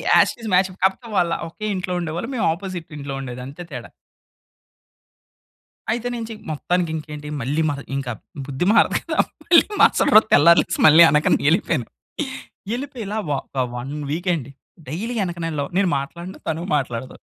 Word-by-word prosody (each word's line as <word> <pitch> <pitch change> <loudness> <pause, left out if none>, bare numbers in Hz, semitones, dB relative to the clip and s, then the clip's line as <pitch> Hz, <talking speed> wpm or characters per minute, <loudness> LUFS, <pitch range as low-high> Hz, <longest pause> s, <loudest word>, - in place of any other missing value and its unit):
As - - +6
it - - -21
is 220 - -3
match. 185 +1 +4
కాకపోతే 190 +5 +1
వాళ్ళ 175 -2 +2 0.2
ఒకే 215 +5 -7
ఇంట్లో 180 -1 -3
ఉండేవాళ్ళు 170 +8 -4
మేము 225 - 0
ఆపోజిట్ 185 -2 -7
ఇంట్లో 140 -1 -5
ఉండేదంతే 130 +5 -7
తేడా. 125 -3 -7 2.0
అయితే 240 +1 -2
నేను 230 -1 -4
చెయ్ 215 -1 -8
మొత్తానికి 175 +2 -1
ఇంకేంటి 150 -1 -7
మళ్ళీ 145 +6 0
మహ 140 -1 -3 0.2
ఇంక 135 -3 -3 0.4
బుద్ధి 140 +5 -2
మారదు 225 - +4
కదా! - - -4 0.3
మళ్ళీ 335 - +6 0.2
మరసట - - +5
రోజు 215 - +8
తెల్లారి 170 +2 +7
లేచి - - -4
మళ్ళీ 160 +2 +8
వెనకన 150 +1 +3
ఎళ్ళిపోయాను. 160 - +1 0.9
ఎళ్ళిపోయి 265 -2 -6
ఇలా 215 +2 -3
వ - - 0 0.2
ఒక 130 -2 -1
1 130 +4 -5 0.2
వీక్ 175 +4 -2
అండి. 140 -3 -6 0.4
డైలీ 215 - -4
ఎనకన 170 -2 -4
ఎళ్ళడం. 140 -2 -3
నేను 190 -3 +2
మాట్లాడను. 170 +7 -8
తను 160 +1 -2
మాట్లాడదు. 130 -3 -3
165 Hz, 165 wpm, -22 LUFS, 140-190 Hz, 2.0 s, రోజు